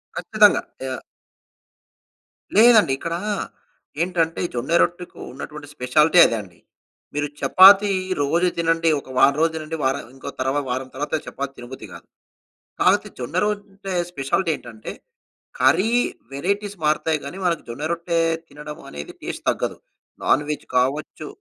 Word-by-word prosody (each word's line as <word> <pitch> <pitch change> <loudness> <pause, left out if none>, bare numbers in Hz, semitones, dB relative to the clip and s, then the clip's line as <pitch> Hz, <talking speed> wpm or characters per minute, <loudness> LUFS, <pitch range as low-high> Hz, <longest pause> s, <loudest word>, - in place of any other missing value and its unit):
ఖచ్చితంగా! 210 -1 +4 0.2
యహ్! 130 0 -4 1.6
లేదండి. 220 - +6
ఇక్కడా, 170 +3 -3 0.8
ఏంటంటే 170 -2 0
ఈ - - -3
జొన్న 125 +6 -3
రొట్టెకు 175 +1 -2
ఉన్నటువంటి 150 +2 -8
స్పెషాలిటీ 150 +7 +3
అదే 115 - +1
అండి. 90 -4 -16 0.5
మీరు 145 0 -1
చపాతీ 200 +2 +7 0.3
రోజు 170 +6 +2
తినండి. 165 0 +2
ఒక 130 - -15
వారం 140 +2 +5
రోజు 165 0 +3
తినండి. 160 0 -5
వారం 130 0 +1
ఆహ్, - - -17
ఇంకో 135 - -7
తర్వా 135 +3 0
వారం 130 +1 -2
తర్వాత 145 +2 -4
చపాతీ 140 0 -5
తినబుద్ది 120 +2 -9
గాదు. - - -12 0.7
కాపోతే - - +3
జొన్నరొట్టె 195 +6 -3 0.2
స్పెషాలిటీ 160 +4 0
ఏంటంటే, 110 -5 -9 0.7
కర్రీ 215 +4 +4 0.4
వేరైటీస్ 200 +8 -2
మారతాయి 155 +1 +1
గాని, 160 +7 -7
మనకు 170 -3 0
జొన్నరొట్టె 170 +6 -2 0.3
తినడం 150 +1 -9
అనేది 70 0 -8
టేస్ట్ - - -5
తగ్గదు. - - -3 0.5
నాన్‌వెజ్ 150 +1 +1
కావచ్చు. 140 +4 -1
155 Hz, 125 wpm, -22 LUFS, 135-180 Hz, 1.6 s, చపాతీ